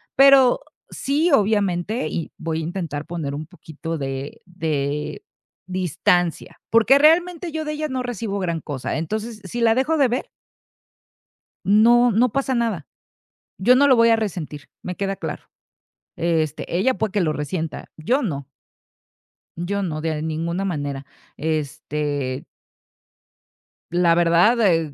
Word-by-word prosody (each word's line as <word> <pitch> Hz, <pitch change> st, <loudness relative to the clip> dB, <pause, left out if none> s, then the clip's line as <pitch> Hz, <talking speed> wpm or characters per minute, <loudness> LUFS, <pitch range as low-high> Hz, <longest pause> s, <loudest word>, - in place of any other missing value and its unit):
Pero, 270 Hz, -2 st, +6 dB, 0.3 s
sí, 300 Hz, +5 st, 0 dB
obviamente, 205 Hz, -, +1 dB
y 165 Hz, -, -4 dB
voy 160 Hz, 0 st, -3 dB
a -, -, -3 dB
intentar 160 Hz, -3 st, -4 dB
poner 155 Hz, -5 st, -4 dB
un 155 Hz, +2 st, -5 dB
poquito 165 Hz, -2 st, -7 dB
de 135 Hz, +1 st, -5 dB
de 150 Hz, -, -3 dB, 0.4 s
distancia, 175 Hz, -1 st, 0 dB
porque 230 Hz, +4 st, +6 dB
realmente 335 Hz, +2 st, +3 dB
yo 315 Hz, 0 st, -3 dB
de 300 Hz, -, -3 dB
ella 305 Hz, 0 st, -2 dB
no 260 Hz, -1 st, -2 dB
recibo 220 Hz, -4 st, -3 dB
gran 170 Hz, -3 st, -1 dB
cosa. 140 Hz, -4 st, -4 dB
Entonces 215 Hz, +8 st, -4 dB
si 235 Hz, +6 st, -4 dB
la 225 Hz, -1 st, +4 dB
dejo 295 Hz, +6 st, +1 dB
de 275 Hz, -, +5 dB
ver 245 Hz, +2 st, -2 dB, 1.4 s
No, 235 Hz, +4 st, +5 dB
no 240 Hz, +4 st, +3 dB
pasa 270 Hz, -1 st, 0 dB
nada. 225 Hz, -10 st, -1 dB, 0.7 s
Yo 245 Hz, +7 st, +5 dB
no 285 Hz, +2 st, +5 dB
lo 260 Hz, -, +6 dB
voy 230 Hz, -1 st, +5 dB
a 225 Hz, -, +6 dB
resentir. 170 Hz, -9 st, -5 dB
Me 180 Hz, -, -5 dB
queda 195 Hz, +1 st, -2 dB
claro, -, -, -6 dB, 0.7 s
este, 165 Hz, -1 st, -1 dB
ella 260 Hz, +7 st, +2 dB
puede 220 Hz, -1 st, -1 dB
que 205 Hz, -2 st, +1 dB
lo 155 Hz, -3 st, +1 dB
resienta. 155 Hz, +2 st, -4 dB
Yo 250 Hz, -, +1 dB
no. 140 Hz, -, -3 dB, 1.1 s
Yo 200 Hz, +3 st, -2 dB
no, 155 Hz, -5 st, -3 dB
de 155 Hz, -1 st, -2 dB
ninguna 165 Hz, +4 st, -2 dB
manera, 145 Hz, -6 st, -3 dB, 0.3 s
este 145 Hz, -3 st, -2 dB, 1.5 s
La 175 Hz, -1 st, +3 dB
verdad, 175 Hz, +7 st, +4 dB
eh, 165 Hz, -8 st, +2 dB
180 Hz, 140 wpm, -22 LUFS, 155-235 Hz, 1.5 s, Pero